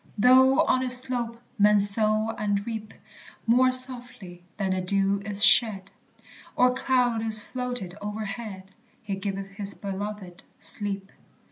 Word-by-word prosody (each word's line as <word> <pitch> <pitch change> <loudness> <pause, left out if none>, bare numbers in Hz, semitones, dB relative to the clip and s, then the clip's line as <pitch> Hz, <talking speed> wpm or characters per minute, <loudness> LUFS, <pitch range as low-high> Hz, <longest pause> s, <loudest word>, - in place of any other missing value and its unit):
Though 260 +4 +4
on 255 - 0
its 255 -1 +8
slope 245 -2 -1 0.2
men 210 0 +3
sow 215 +2 +2
and 205 -1 -3
reap; 220 -2 -8 0.5
More 255 +3 +2
softly 245 -8 +1
than 195 -2 -3
the 185 0 -3
dew 195 +1 -2
is 205 +1 +2
shed, 200 -7 +4 0.6
Or 250 0 +2
cloud 250 -3 -1
is 220 -1 +4
floated 245 -5 -7
overhead, 205 -2 -8 0.3
"He 200 -2 -5
giveth 195 0 -7
his 200 0 -6
beloved 195 -2 -8 0.2
sleep." 200 -1 -3
210 Hz, 130 wpm, -24 LUFS, 195-245 Hz, 0.6 s, its